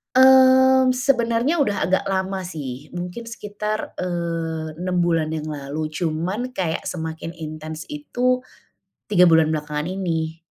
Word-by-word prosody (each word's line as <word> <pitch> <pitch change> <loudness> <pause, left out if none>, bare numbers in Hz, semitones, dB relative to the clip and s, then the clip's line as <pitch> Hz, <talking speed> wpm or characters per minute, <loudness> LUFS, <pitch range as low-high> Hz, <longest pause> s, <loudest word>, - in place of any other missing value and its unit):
Mmm, 260 0 +7
sebenarnya 250 +2 +1
sudah 235 - +1
agak 190 +1 +2
lama 190 0 -2
sih, 145 -5 -7
mungkin 180 +6 -6
sekitar, 210 -1 -5
eee, 165 -3 -3
6 180 +1 -1
bulan 165 -2 +1
yang 155 -1 -4
lalu, 150 +1 -4
cuma 165 +3 -2 0.2
kayak 170 -8 -2
semakin 160 -1 -5
intens 155 -1 -7
itu 255 -4 -1 0.7
3 180 -3 +6
bulan 160 -2 +5
belakangan 150 +1 -2
ini. 165 -3 -2
175 Hz, 125 wpm, -22 LUFS, 160-230 Hz, 0.7 s, Mmm